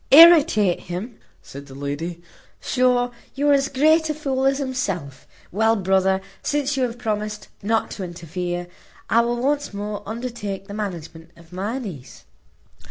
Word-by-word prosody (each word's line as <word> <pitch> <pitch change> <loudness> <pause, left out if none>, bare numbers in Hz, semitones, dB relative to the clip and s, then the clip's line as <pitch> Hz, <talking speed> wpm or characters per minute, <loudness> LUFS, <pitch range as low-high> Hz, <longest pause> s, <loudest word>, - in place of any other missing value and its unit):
"Irritate 290 - +8
him?" 195 +7 -6 0.2
said 140 +1 -10
the 135 - -11
lady; 155 +5 -4 0.4
"sure, 250 -1 +2 0.2
you 290 +1 +1
are - - +7
as 275 -1 +3
great 315 +4 +3
a 305 - -1
fool 270 -3 -1
as 270 0 +2
himself. 195 - -3 0.2
Well, 220 +4 +3
brother, 190 -1 +2 0.2
since 290 -1 0
you 270 - -1
have 235 -1 -5
promised 210 -2 -3
not 220 +2 0
to 195 - -5
interfere, 175 0 -4 0.5
I 230 - +6
will 240 0 -1
once 285 -3 0
more 205 0 -4
undertake 220 -5 -5
the 200 - -8
management 170 -6 -6
of 170 +1 -17
my 205 +7 -2
niece. 170 - -8
210 Hz, 155 wpm, -23 LUFS, 180-260 Hz, 0.5 s, Irritate